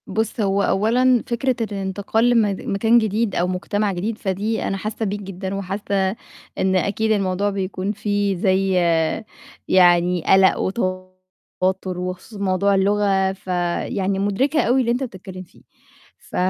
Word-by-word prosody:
بُص، 220 +2 -2
هو 200 0 +1
أولًا 240 +5 +2
فكرة 250 +2 0
الإنتقال 205 +2 -1
لمد 215 -5 +2
مكان 225 +4 +2
جديد 220 -1 0
أو 175 - +1
مجتمع 200 +3 -1
جديد، 210 +5 -3
فدي 205 +3 -2
أنا 195 - -2
حاسّة 215 +3 -4
بيك 205 0 -3
جدًا، 190 0 -5
وحاسّة 195 0 -2 0.4
إن 190 0 +1
أكيد 210 +4 0
الموضوع 200 -1 +1
بيكون 195 0 -3
فيه 205 -1 -1
زي 190 +1 +1 0.9
يعني 175 -1 +4
قلق 190 0 +5
وتوتّر 185 -1 -3
وخصوصًا 185 +4 -6
موضوع 195 +1 +2
اللغة 195 -1 +2
فيعني 185 +1 -2
مُدركة 250 +11 +1
أو 245 +3 +2
اللي 240 -3 +2
أنت 245 +3 -1
بتتكلّم 190 -5 -8
فيه، 175 - -22 0.6
ف - - -13
195 Hz, 135 wpm, -21 LUFS, 185-215 Hz, 0.9 s, قلق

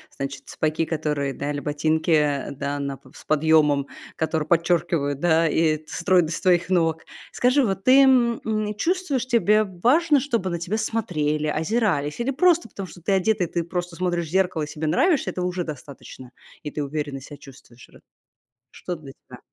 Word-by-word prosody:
значит, 135 0 -5
сапоги, 155 +1 -1
которые, 150 -4 -2
да, 145 +3 -4
или 145 - -3
ботинки, 150 0 +1
да, 140 +1 -4
на 140 -1 -3
п 135 -1 -20
с - - -14
подъемом, 150 -2 +3 0.3
которые 160 -1 -1
подчеркивают, 165 -4 +1
да, 165 0 +3
и 155 -1 +1
стройность 175 -3 +1
твоих 180 -2 +2
ног. 165 -3 +1 0.3
Скажи, 255 +2 +3
вот 195 -2 -2
ты, 270 +2 +7
м, 245 -3 +4
м, 215 -1 -1
чувствуешь, 330 - -1
тебе 215 -3 +3
важно, 270 - +2
чтобы 230 -9 -1
на 170 - -3
тебя 180 +6 -2
смотрели, 155 -10 -1
озирались, 160 0 0
или 255 +3 0
просто 345 +4 +2
потому, 195 -1 -7
что 175 - -14
ты 200 - -2
одета, 195 +1 +2
и - - -1
ты 170 +1 -2
просто 175 -1 -4
смотришь 175 -2 -1
в - - -11
зеркало 185 -3 +1
и 150 - -4
себе 155 +1 -4
нравишься, 300 - +2
этого 180 0 -3
уже 180 -1 -2
достаточно, 140 -4 -10 0.3
и 150 - -5
ты 150 - -4
уверенно 145 -1 -4
себя 145 +3 -11
чувствуешь 125 -3 -16
ра - - -18 0.7
Что 180 - -6
для 150 -4 -11 0.2
тебя? - - -12
170 Hz, 180 wpm, -23 LUFS, 150-210 Hz, 0.7 s, ты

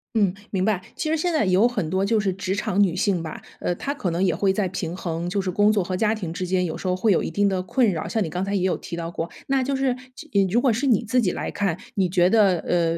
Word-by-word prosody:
嗯， 200 -5 +3 0.2
明 190 -2 0
白， 205 -4 +1
其 310 - -3
实 320 - +2
现 345 +3 0
在 310 -10 +2
有 190 +5 +4
很 245 -10 -2
多 190 +3 0
就 220 +2 +2
是 195 -3 0
职 190 0 -2
场 200 -1 0
女 180 -4 +3
性 185 -3 +1
吧， 160 -1 -6 0.2
呃， 175 - -1
她 280 +10 -3
可 195 -11 -2
能 170 +3 0
也 185 - +2
会 195 -1 +2
在 195 0 0
平 175 -1 -4
衡， 170 0 -3
就 200 - -1
是 190 -1 -1
工 205 +3 +4
作 205 -4 +1
和 185 +1 -3
家 215 +3 +1
庭 175 -7 -5
之 180 0 -3
间 180 0 +1
有 160 - -3
时 185 - -5
候 180 - +2
会 205 +3 +2
有 175 - +3
一 - - -3
定 205 0 +1
的 190 -2 0
困 210 +5 +2
扰， 160 -3 -3
像 220 -3 0
你 - - -3
刚 180 +4 -2
才 200 +1 -1
也 190 - 0
有 185 - +2
提 170 - -7
到 170 0 -4
过。 170 0 -4 0.2
那 270 -1 +2
就 275 +2 -1
是， 270 0 0 0.5
呃， 200 - +4
如 235 +6 +3
果 255 -5 +4
是 265 +5 -1
你 235 -2 +3
自 245 +2 +2
己 185 - +1
来 - - -4
看， 195 -5 -1 0.2
你 190 -3 +1
觉 175 -1 +3
得， 195 -3 +4
呃， 170 -1 0
190 Hz, 325 characters per minute, -23 LUFS, 180-215 Hz, 0.5 s, 有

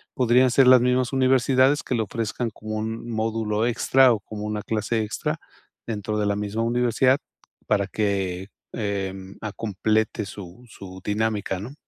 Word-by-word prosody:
Podrían 125 +1 +4
ser 130 +1 +5
las 130 -1 +8
mismas 125 +1 +1
universidades, 130 +1 +3
que 125 - -2
lo 115 - +1
ofrezcan, 115 +3 -3
como 110 +1 -7
un 110 +2 -4
módulo 110 -1 -1
extra, 130 +1 +4
o 110 - -2
como 105 +1 -8
una 105 0 -3
clase 110 +1 -1
extra, 105 - -3 0.5
dentro 105 -1 -3
de 105 - +1
la 100 - +1
misma 105 +2 -2
universidad, 125 +2 +2 0.5
para 100 -2 +1
que, 95 -2 -2 0.2
em, 95 -3 -4
ah, 110 - -4
complete 110 0 0
su 95 +2 -10
su 95 -3 -11
dinámica, 105 -2 -1
¿no? 120 +8 -7
110 Hz, 155 wpm, -24 LUFS, 105-120 Hz, 0.5 s, las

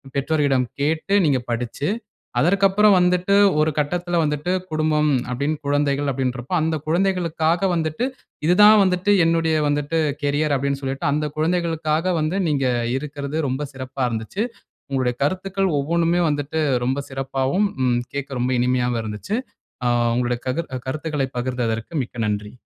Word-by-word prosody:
பெற்றோரீடம் 140 -3 +1
கேட்டு 160 +7 0
நீங்க 140 -4 +2
படிச்சு, 125 +5 -2 0.5
அதற்கு 195 +3 +3
அப்பறம் 200 0 +4
வந்துட்டு 180 +2 +2 0.3
ஒரு 155 0 +3
கட்டத்துல 175 +3 0
வந்துட்டு 150 +3 -1 0.2
குடும்பம் 155 -1 +1 0.2
அப்டின் 140 +5 -1
குழந்தைகள் 145 0 +1
அப்டின்றப்போ, 125 +2 -3
அந்த 160 0 0
குழந்தைகளுக்காக 170 -1 +1
வந்துட்டு, 160 +7 -1 0.4
இது 175 - +4
தான் 210 0 +8
வந்துட்டு 185 +2 +1
என்னுடைய 165 -1 +2
வந்துட்டு 145 +2 0 0.2
கேரியர் 145 +1 +1
அப்டின் 140 +1 -1
சொல்லிட்டு, 135 0 -3
அந்த 150 +1 0
குழந்தைகளுக்காக 165 0 0
வந்து 155 +5 -1
நீங்க 140 -2 +1 0.3
இருக்கிறது, 145 0 -5
ரொம்ப 135 +3 -2
சிறப்பா 130 0 -5
இருந்துச்சு. 115 - -3 0.5
உங்களுடைய 130 -2 0
கருத்துக்கள் 190 +4 0
ஒவ்வொண்ணுமே 170 +4 +1
வந்துட்டு 145 +1 -2 0.3
ரொம்ப 135 +2 0
சிறப்பாவும், 135 +8 0 0.2
ம் 120 -1 +2
கேட்க 140 -2 -4
ரொம்ப 125 +1 0
இனிமையாவும் 125 -1 +1
இருந்துச்சு. 110 - -4 0.5
ஆ - - +3 0.3
உங்களுடைய 120 0 0
கதிர் 165 +5 -2 0.2
கருத்துகளை 150 -1 -2
பகிர்ந்ததற்கு 120 +2 -2
மிக்க 120 -1 -10
நன்றி. 105 0 -3
150 Hz, 135 wpm, -22 LUFS, 130-170 Hz, 0.5 s, தான்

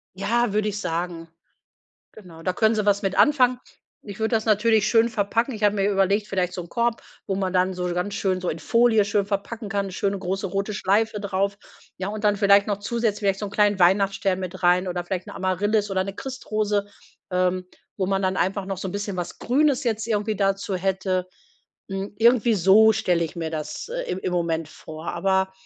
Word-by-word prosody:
Ja, 215 +3 0
würde 215 0 +1
ich 205 0 -4
sagen. 165 -2 -3 0.9
Genau, 175 -6 -13
da 180 +2 -1
können 220 +1 +2
sie 210 -1 0
was 200 -1 +3
mit 195 -1 -2
anfangen. 255 -4 +4 0.4
Ich 205 +1 -9
würde 220 +1 +1
das 220 - 0
natürlich 215 0 +3
schön 230 0 +4
verpacken. 230 +4 0
Ich 215 -1 -6
habe 205 0 +3
mir 200 +1 +1
überlegt, 200 +1 +1
vielleicht 180 -2 -1
so 180 - -4
'n 170 - -11
Korb, 235 -1 0 0.3
wo 195 - -1
man 190 -1 -1
dann 185 0 +1
so 180 -1 -3
ganz 180 +3 -2
schön 190 -2 0
so 180 - -5
in 165 - -4
Folie 230 -1 +3
schön 205 0 0
verpacken 205 +2 -4
kann, 200 0 -1
'ne - - -8
schöne, 195 +1 -1
große, 190 +1 -3
rote 195 +3 -2
Schleife 210 +2 +1
drauf. 200 0 -1 0.4
Ja, 190 - -3
und 210 +1 -5
dann 205 -1 +3
vielleicht 200 0 +5
noch 205 - 0
zusätzlich 220 0 -1
vielleicht 195 -2 0
so 205 - -3
'n - - -8
kleinen 205 -1 +2
Weihnachtsstern 195 +1 +2
mit 185 0 -6
rein 180 +1 +3
oder 175 -1 -3
vielleicht 185 +1 -4
'ne - - -9
Amaryllis 205 +3 0
oder 190 -1 +1
'ne 195 - -5
Christrose, 215 -6 -2 0.5
ähm, 185 0 0 0.3
wo 190 - 0
man 195 +1 0
dann 185 -1 0
einfach 190 +2 0
noch 195 -1 -4
so 190 - -4
'n - - -5
bisschen 205 -1 -4
was 175 -1 -5
Grünes 280 +2 +2
jetzt 220 -2 -1
irgendwie 215 -1 0
dazu 195 -1 0
hätte. 185 0 -1 0.6
Hm, 195 +1 -4
irgendwie 235 0 +4
so 210 +3 +6
stelle 180 -6 +1
ich 165 - -5
mir 165 -2 -3
das, 155 - -5
äh, - - -3
im 185 - -2
im 185 - -3
Moment 165 -2 -1
vor. 160 +1 -10
Aber, 190 +1 +1
200 Hz, 215 wpm, -24 LUFS, 185-215 Hz, 0.9 s, so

